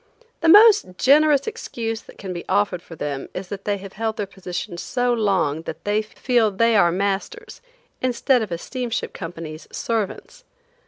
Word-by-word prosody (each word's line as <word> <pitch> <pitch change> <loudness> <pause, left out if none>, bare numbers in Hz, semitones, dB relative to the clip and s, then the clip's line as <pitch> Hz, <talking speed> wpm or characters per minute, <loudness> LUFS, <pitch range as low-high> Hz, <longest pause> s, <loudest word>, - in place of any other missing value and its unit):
The 330 - +2
most 410 - +7
generous 290 +1 +4
excuse 230 - -4
that - - -16
can 190 -3 -6
be 175 - -6
offered 135 - +1
for 170 - -12
them 145 -3 -4
is 185 -1 -5
that 195 -1 -7
they 205 -1 0
have 195 0 -10
held 220 +1 -2
their 205 - -1
positions 180 -2 -6
so 245 -1 0
long 195 -9 +1
that - - -8
they 205 +1 +1
feel 230 +1 +1
they 230 +3 +2
are 175 -4 +5
masters, 195 +2 -3 0.4
instead 255 0 +2
of 215 -4 -4
a 170 - -1
steamship 245 +5 -4
company's 165 -3 -8
servants. 225 - -3
205 Hz, 170 wpm, -22 LUFS, 180-245 Hz, 0.4 s, most